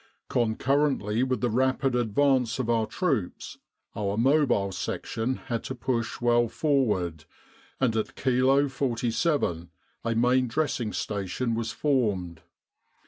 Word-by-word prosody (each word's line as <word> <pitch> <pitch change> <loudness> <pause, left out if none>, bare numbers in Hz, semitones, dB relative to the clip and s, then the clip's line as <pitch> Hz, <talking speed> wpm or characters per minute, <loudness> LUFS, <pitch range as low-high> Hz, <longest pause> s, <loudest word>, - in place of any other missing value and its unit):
"Concurrently 120 -1 +1
with 130 -3 0
the 120 - +1
rapid 130 +2 +1
advance 125 0 +2
of 120 -3 -1
our 115 -2 +1
troops, 135 - -2 0.4
our 100 0 -2
Mobile 125 -6 +3
Section 115 +6 -3
had 120 -3 -4
to 130 - -4
push 120 -2 -2
well 120 0 +3
forward, 105 - 0 0.5
and 125 -4 +1
at 110 - -2
Kilo 135 +2 +3
47 120 - -1 0.3
a 115 -1 -1
Main 125 +2 +3
Dressing 125 -4 -1
Station 105 +5 -2
was 115 0 -2
formed. 100 - 0
120 Hz, 120 wpm, -27 LUFS, 110-130 Hz, 0.5 s, Mobile